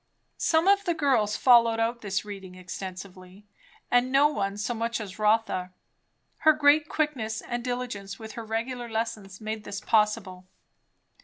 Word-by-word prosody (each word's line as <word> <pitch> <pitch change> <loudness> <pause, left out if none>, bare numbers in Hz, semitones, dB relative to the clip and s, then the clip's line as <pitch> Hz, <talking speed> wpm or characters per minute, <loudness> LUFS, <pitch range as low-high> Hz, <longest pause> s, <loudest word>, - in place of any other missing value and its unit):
Some 320 +2 +2
of 400 0 +5
the 345 -2 0
girls 255 -9 +1
followed 230 -3 +5
out 230 +1 -1
this 200 0 -2
'reading 195 -3 -9
extensively; 185 +1 -9 0.5
and 245 +1 +3
no 280 +2 +5
one 200 -8 -2
so 215 +4 -2
much 230 +1 -2
as 205 -2 -8
Rotha. 210 -4 +1 0.6
Her 315 - +5
great 295 0 +4
quickness 245 -8 -1
and 240 0 -5
diligence 245 -6 -4
with 220 -1 -9
her 230 +2 -7
regular 235 +2 -4
lessons 220 -4 -4
made 215 -1 -5
this 200 0 -5
possible. 210 -4 0
225 Hz, 150 wpm, -27 LUFS, 200-245 Hz, 0.6 s, of